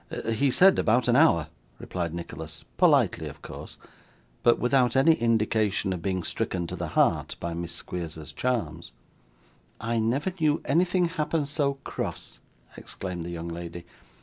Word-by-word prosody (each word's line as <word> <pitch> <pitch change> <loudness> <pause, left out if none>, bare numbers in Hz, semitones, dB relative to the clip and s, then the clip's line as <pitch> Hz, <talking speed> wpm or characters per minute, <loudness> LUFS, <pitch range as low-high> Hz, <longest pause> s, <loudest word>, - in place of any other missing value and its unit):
'He 125 +5 +2
said 185 +8 +5
about 120 +2 +2
an 120 - +4
hour,' 135 - +5 0.3
replied 85 -3 -4
Nicholas 80 -2 -8
politely - - +3
of - - -11
course, - - -9 0.6
but 120 - +4
without 125 -1 +2
any 135 +5 +6
indication 110 -5 +1
of 90 - -5
being 95 -1 -1
stricken 90 0 -2
to 90 - -5
the 85 -1 -4
heart - - +2
by 85 0 -3
Miss 85 0 -4
Squeers's 85 -3 -5
charms. 85 -11 -2 0.9
'I 115 +1 -1
never 135 +11 0
knew 155 -1 +2
anything 175 +4 +2
happen 155 -2 -1
so 140 -1 0
cross,' - - -5 0.4
exclaimed 90 -3 -6
the 85 - -6
young 85 -1 -5
lady. 85 0 -7
110 Hz, 150 wpm, -27 LUFS, 85-140 Hz, 0.9 s, any